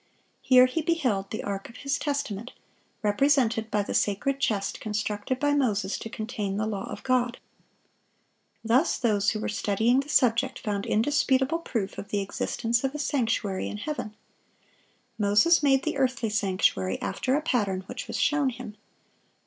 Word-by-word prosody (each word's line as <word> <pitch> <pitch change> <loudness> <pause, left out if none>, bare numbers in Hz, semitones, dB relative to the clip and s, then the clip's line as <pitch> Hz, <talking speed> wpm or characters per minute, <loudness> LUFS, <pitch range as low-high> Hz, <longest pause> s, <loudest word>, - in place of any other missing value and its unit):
Here 255 -1 +6
he 255 +6 -1
beheld 260 - 0
"the 215 - -4
ark 195 -1 -4
of 235 - -13
His 275 +1 0
testament," 270 -7 -3 0.5
represented 225 0 +2
by 210 -1 +1
the - - -5
sacred 265 +7 0
chest 200 -7 -1
constructed 215 +3 -2
by 290 0 +2
Moses 210 -8 0
to 225 - -7
contain 215 -3 -4
the 215 - 0
law 205 -3 -4
of - - -7
God. 250 -2 +1 1.3
Thus 250 +8 +2
those 210 -4 +2
who 215 - -2
were - - -3
studying 220 +4 +1
the 275 +1 -4
subject 255 -1 +2
found 205 -3 -3
indisputable 270 +5 +2
proof 220 -11 -3
of 200 - -8
the 205 - 0
existence 230 +4 -1
of 270 +2 -1
a - - -2
sanctuary 230 -9 -1
in - - -5
heaven. 215 -4 -5 1.0
Moses 210 +12 +4
made 270 -2 +3
the 315 -2 -2
earthly 255 -4 0
sanctuary 185 - +1
after 260 +1 -1
a 300 - +1
pattern 205 - 0
which 250 +7 -7
was - - -4
shown 290 -2 +2
him. 235 -4 -8
230 Hz, 160 wpm, -27 LUFS, 205-270 Hz, 1.3 s, Here